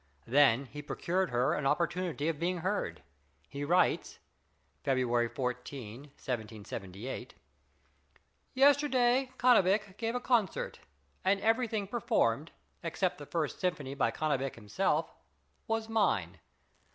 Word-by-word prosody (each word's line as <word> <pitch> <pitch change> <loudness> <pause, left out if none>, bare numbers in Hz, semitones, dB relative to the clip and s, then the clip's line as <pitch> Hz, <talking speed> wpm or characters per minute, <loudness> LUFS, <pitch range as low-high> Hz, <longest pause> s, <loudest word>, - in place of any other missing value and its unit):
Then 135 0 +4
he 145 +3 -8
procured 180 +5 -1
her 125 +5 +2
an 150 -4 0
opportunity 170 0 0
of 165 -3 -1
being 180 +2 0
heard. 180 - -2 0.4
He 140 - -5
writes 175 +5 +2 0.7
(February 120 -3 +1
14, 125 -3 -4
1778): 110 -5 -6 1.2
Yesterday 265 -2 +4
Cannabich 205 -5 +4
gave 230 +1 -2
a - - +1
concert, 240 -5 0 0.4
and 195 +1 +3
everything 225 -2 +1
performed 155 - +1 0.3
except 170 +1 -1
the 145 - -9
first 160 -3 -2
symphony 155 -7 -2
by 140 - +1
Cannabich 135 -4 -1
himself 105 -3 -1 0.5
was 225 0 -1
mine. 105 - +1
155 Hz, 110 wpm, -31 LUFS, 125-205 Hz, 1.2 s, Then